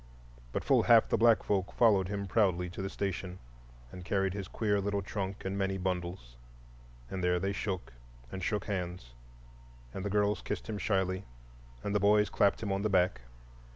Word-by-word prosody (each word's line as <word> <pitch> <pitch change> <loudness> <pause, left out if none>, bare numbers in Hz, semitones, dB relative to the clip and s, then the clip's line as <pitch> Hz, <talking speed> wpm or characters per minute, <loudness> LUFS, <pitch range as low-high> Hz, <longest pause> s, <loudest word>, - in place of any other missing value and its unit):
But - - -2
full - - +4
half - - +5
the - - +2
black 115 0 +5
folk 95 -3 -1
followed 100 -6 +4
him 100 0 -3
proudly 90 -3 +1
to 95 - -6
the 95 - -3
station, 95 -2 -4 0.5
and 90 - -9
carried 95 0 0
his 100 -2 -5
queer 105 -1 0
little 100 0 -1
trunk 95 -1 -4
and 95 +1 -2
many 95 -1 -1
bundles. 90 -9 -4 0.7
And 95 -1 -3
there 90 0 +2
they 95 +2 -1
shook 95 - -4 0.4
and 95 - -5
shook 105 +1 -1
hands, 90 - -4 0.8
and 95 - -5
the 100 - -2
girls 105 -1 +1
kissed 105 - -4
him 105 -2 -4
shyly 95 -2 0 0.6
and 100 - -2
the 105 - +3
boys 105 +1 +4
clapped 100 +2 +2
him 100 - -2
on 95 0 0
the 110 - 0
back. 90 -9 +2
95 Hz, 185 wpm, -31 LUFS, 90-100 Hz, 0.8 s, half